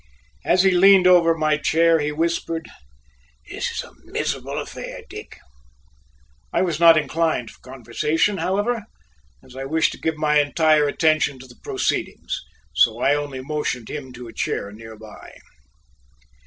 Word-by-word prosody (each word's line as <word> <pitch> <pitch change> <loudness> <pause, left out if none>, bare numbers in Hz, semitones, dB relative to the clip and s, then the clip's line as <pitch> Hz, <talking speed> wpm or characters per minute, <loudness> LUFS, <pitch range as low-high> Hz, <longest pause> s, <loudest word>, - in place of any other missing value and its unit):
As 185 +2 +3
he 190 - +4
leaned 190 +1 +6
over 170 -2 +5
my 155 -1 +1
chair, 165 +2 +3
he 150 0 -1
whispered: 165 +1 -2 0.8
"This - - -4
is - - -4
a - - -14
miserable - - -4
affair, - - -7
Dick!" - - -10 1.1
I - - +1
was 170 -4 -2
not 165 -1 +7
inclined 155 -5 -1
for - - -20
conversation, 150 - -1
however, 205 +4 -1 0.6
as 130 - -16
I 135 0 -5
wished 160 +3 +1
to - - -10
give 160 -1 -1
my 150 -1 +3
entire 150 +1 +3
attention 155 -1 +1
to 130 - -12
the 120 -2 -17
proceedings, - - -2 0.3
so 115 0 +3
I 140 - +3
only 145 -3 -3
motioned 135 -4 -4
him 130 -3 -7
to 125 0 -10
a 115 - -11
chair 100 - -3
nearby. 110 0 -12
155 Hz, 150 wpm, -22 LUFS, 130-165 Hz, 1.1 s, not